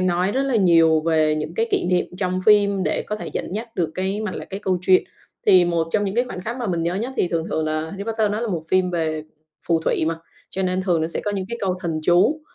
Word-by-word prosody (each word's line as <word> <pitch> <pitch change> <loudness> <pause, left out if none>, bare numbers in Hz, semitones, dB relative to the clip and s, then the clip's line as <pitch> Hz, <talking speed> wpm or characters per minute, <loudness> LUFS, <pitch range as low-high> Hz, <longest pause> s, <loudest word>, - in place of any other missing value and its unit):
nói 185 +1 +1
rất 265 - +1
là 270 -3 +1
nhiều 165 -5 +5
về 155 -1 +2
những 155 +2 -4
cái 225 +5 +1
kỷ - - +1
niệm 180 0 +1
trong 185 -1 -1
phim 200 -2 +4
để - - 0
có 210 - -4
thể - - -6
dẫn - - -4
dắt 225 +3 -4
được 170 -6 -1
cái 190 +3 -2
mạch 215 -3 -3
lạc, - - -6
cái 195 +1 -5
câu 190 -3 0
chuyện. 185 0 +4 0.4
Thì 185 -3 +7
một 170 -1 0
trong 205 +2 +1
những 195 -1 -2
cái 240 +2 +2
khoảnh 185 - -7
khắc 230 +6 -4
mà 245 - -3
mình 170 -4 -1
nhớ 170 +2 -1
nhất 230 +7 -3
thì 180 - +1
thường 165 -2 -1
thường 160 - 0
là 155 0 -1
Harry 195 +2 -6
Potter 220 -1 0
đó 210 - -2
là 235 - -2
một 170 -6 -2
phim 185 0 +2
về 160 -3 -1 0.5
phù 165 -1 +3
thủy 160 - +1
mà, 165 +1 0 0.4
cho 190 - -3
nên 185 0 0
thường 175 -4 +1
nó 160 - 0
sẽ 165 - -3
có 205 - 0
những 195 -2 -2
cái 235 +1 -5
câu 190 -2 0
thần 165 -3 -2
chú, 180 - +3
185 Hz, 280 wpm, -22 LUFS, 165-205 Hz, 0.5 s, Thì